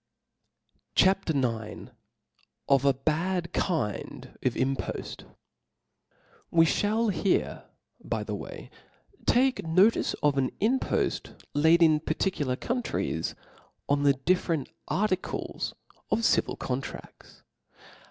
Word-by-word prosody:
CHAP. 190 -1 +4
IX. 115 -7 -2 0.8
Of 140 -1 +3
a 140 - +5
bad 170 +5 -1
kind 155 - -2
g/*Impoft. 130 +2 -2 1.3
TXT 165 +2 +3
E - - +3
(hall 225 +1 +1
here, 195 0 0 0.4
by - - -2
the - - -5
way, - - -8 0.6
take 260 +2 +3
notice 185 +7 +3
of 145 -2 +3
an 130 - +1
y^ 245 +6 +2
impoft - - -2 0.2
Jaid 160 +3 +5
in 155 -2 +5
particular 150 -5 -1
countries 245 - -2 0.5
on 145 0 +2
the 140 -1 +5
different 160 0 0 0.2
articles 190 -2 -2 0.3
of 230 - +1
civil - - +2
contrafts. 130 +1 -6
160 Hz, 105 wpm, -28 LUFS, 135-190 Hz, 1.3 s, a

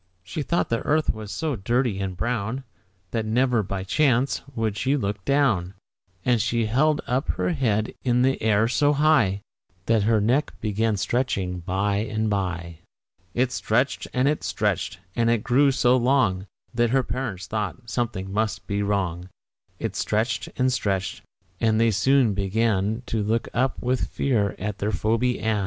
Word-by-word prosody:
She 100 +11 -4
thought 170 +4 0
the 115 - +1
earth 155 +1 +1
was 110 -2 -8
so 155 +6 -2
dirty 120 0 0
and 95 -2 -3
brown, 120 +4 -2 0.5
That 115 - -1
never, 120 +2 +2
by 95 -1 -4
chance, 130 +4 +2
would 110 -3 -1
she 130 +7 +1
look 100 -5 -3
down; 110 -11 +2 0.5
And 120 -3 +3
she 115 +1 0
held 145 +7 +2
up 130 +5 -1
her - - -1
head 110 -9 0
in 125 -1 +2
the 135 +1 +1
air 110 0 +3
so 145 +5 +2
high 140 -10 +3 0.4
That 115 -2 +3
her 110 +1 +3
neck 125 +8 +1
began 110 0 0
stretching 100 -4 -1
by 100 +4 0
and 110 0 -1
by. 85 -4 -3 0.6
It 125 +1 +2
stretched 125 +2 0
and 130 +1 +1
it 150 +1 0
stretched; - - -1 0.2
and 115 -1 +2
it 115 -2 +1
grew 135 +3 +4
so 125 -1 +3
long 120 -7 +2 0.3
That 120 -1 +2
her 130 +2 +2
parents 110 -6 -4
thought 110 +4 -4
something 110 -6 -3
must 110 +1 -1
be 100 -1 -1
wrong. 95 -3 -1 0.5
It - - -4
stretched 110 0 -1
and 130 0 +2
stretched, 95 -5 -1 0.4
and 110 -1 +2
they 115 0 +4
soon 130 +1 +3
began 105 +2 0
To 110 - -1
look 110 +3 0
up 130 +2 0
with 125 +1 0
fear 110 -7 0
at 105 +1 -4
their 105 +1 0
Phoebe 115 +5 0
Ann. 110 -1 0
110 Hz, 165 wpm, -24 LUFS, 100-125 Hz, 0.6 s, grew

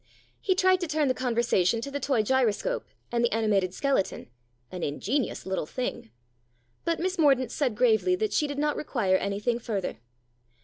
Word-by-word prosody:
He 375 - +1
tried 370 0 +4
to 350 - -1
turn 305 -2 +1
the - - +3
conversation 235 -5 +1
to 280 - -5
the 285 - -3
toy 265 -5 +1
gyroscope 260 - 0 0.2
and 240 0 +1
the 240 - +2
animated 205 -4 +1
skeleton, 270 - -1 0.2
" 120 0 -42
an 180 - -6
ingenious 215 - -2
little 190 -5 -2
thing." 250 - -4 0.8
But 335 -1 0
Miss 370 +1 -2
Mordaunt 270 -5 +4
said 260 -7 0
gravely 250 +9 +3
that 430 +3 -1
she 300 - +2
did 285 -1 -5
not 295 0 +1
require 205 -10 +1
anything 210 +5 -1
further. 205 -5 -3
245 Hz, 175 wpm, -27 LUFS, 205-295 Hz, 0.8 s, tried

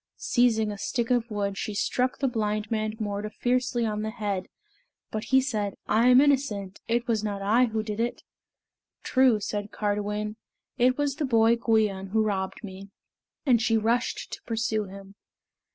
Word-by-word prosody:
Seizing 225 -3 +2
a 205 - -7
stick 235 +3 -2
of 240 -1 +1
wood, 200 -2 -2
she 210 - -3
struck 255 +5 0
the 275 - 0
blind 215 -3 -2
man 215 -1 -1
Morda 205 0 -3
fiercely 245 +2 0
on 210 -1 -2
the 215 - -2
head, 205 -4 -3 0.6
but 215 +1 -3
he 265 - +4
said, 215 -7 -2
"I 225 +3 +3
am 250 0 +8
innocent. 250 -9 +1
It 235 +1 0
was 220 -3 0
not 200 -2 -3
I 225 +5 +4
who 220 -2 -2
did 215 0 -5
it." 235 +1 -2 0.8
"True," 255 -4 +4
said 205 0 -4
Cardiwen; 210 +1 -2 0.4
"it 255 +1 +3
was 285 -2 -1
the 300 - 0
boy 230 -2 +4
Gwion 215 -4 +1
who 220 +2 +2
robbed 195 +1 -2
me;" 195 0 -9 0.6
and 245 -5 +4
she 225 -1 +2
rushed 230 +2 0
to - - -6
pursue 225 -2 -1
him. 195 0 -11
220 Hz, 170 wpm, -27 LUFS, 205-240 Hz, 0.8 s, am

